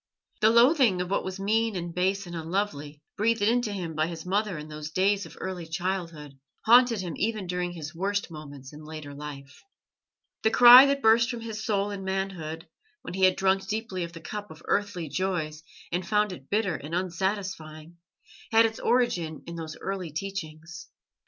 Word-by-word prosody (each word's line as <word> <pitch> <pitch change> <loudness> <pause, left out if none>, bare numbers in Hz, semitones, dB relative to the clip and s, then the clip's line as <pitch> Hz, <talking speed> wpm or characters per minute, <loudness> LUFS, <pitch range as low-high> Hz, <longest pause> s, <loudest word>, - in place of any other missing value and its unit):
The 215 - +5
loathing 235 - +5
of 180 +1 -3
what - - +1
was 190 +1 -5
mean 220 +2 +1
and 170 -1 -4
base 190 +2 0
and 175 -1 -8
unlovely, 160 -4 -3
breathed 225 0 +1
into 230 +1 +2
him 180 -5 -4
by 155 +1 0
his 165 -1 -7
mother 200 -1 0
in 150 0 -8
those 150 0 -7
days 195 +4 +1
of - - -15
early 180 -3 -5
childhood, 165 -5 -4 0.3
haunted 235 -2 +6
him 175 -3 -5
even 215 -1 -1
during 180 0 -2
his 155 -2 -7
worst 200 +2 -2
moments 145 -3 -10
in 150 +1 -11
later 155 -2 -8
life. 140 -1 -9 0.8
The 220 - +3
cry 245 +4 +10
that 275 0 0
burst 230 +2 +5
from 240 -2 -4
his 220 -1 -6
soul 205 -2 0
in 200 -1 -6
manhood, 185 -4 -4 0.4
when - - -7
he 190 0 +3
had 185 - +4
drunk 190 0 +1
deeply 210 -3 -3
of 170 - -6
the 165 - -10
cup 210 +3 -6
of 160 +1 -13
earthly 200 -5 -1
joys 160 -3 -2 0.3
and 175 +1 -1
found 210 +2 +1
it 140 -7 -11
bitter 205 -2 +1
and 150 +4 -5
unsatisfying, 175 -3 -3 0.5
had 225 0 +6
its 225 0 -2
origin 175 - 0
in 170 - -7
those 160 -2 -7
early 190 -3 -4
teachings. 170 0 -6
185 Hz, 185 wpm, -27 LUFS, 160-210 Hz, 0.8 s, cry